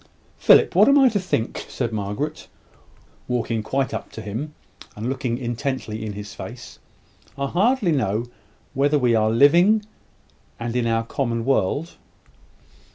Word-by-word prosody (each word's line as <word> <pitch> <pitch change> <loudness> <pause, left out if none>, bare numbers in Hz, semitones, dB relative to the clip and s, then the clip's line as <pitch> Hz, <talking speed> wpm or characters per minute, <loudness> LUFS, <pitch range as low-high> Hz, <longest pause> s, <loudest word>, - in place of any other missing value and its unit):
"Philip, - - +5
what - - +6
am 280 - +6
I 270 -2 +6
to 210 - 0
think?" 180 -11 -2
said 115 - -3
Margaret, 105 +9 -4 0.8
walking 115 -2 -1
quite 135 +5 -1
up - - -5
to 110 - -7
him, 125 +9 -5 0.4
and 110 +3 -4
looking 130 -2 -2
intently 120 -3 -4
in 105 -1 -4
his 105 +1 -8
face. 120 +2 -10 0.6
"I 140 - -1
hardly 205 - +2
know 115 -5 0 0.5
whether 145 +2 +2
we 125 -4 +2
are 110 -1 +3
living, 175 - +5 0.7
and 120 0 -4
in 120 -2 +1
our 115 0 +1
common 115 -2 -2
world." 140 - 0
125 Hz, 145 wpm, -22 LUFS, 115-150 Hz, 0.8 s, what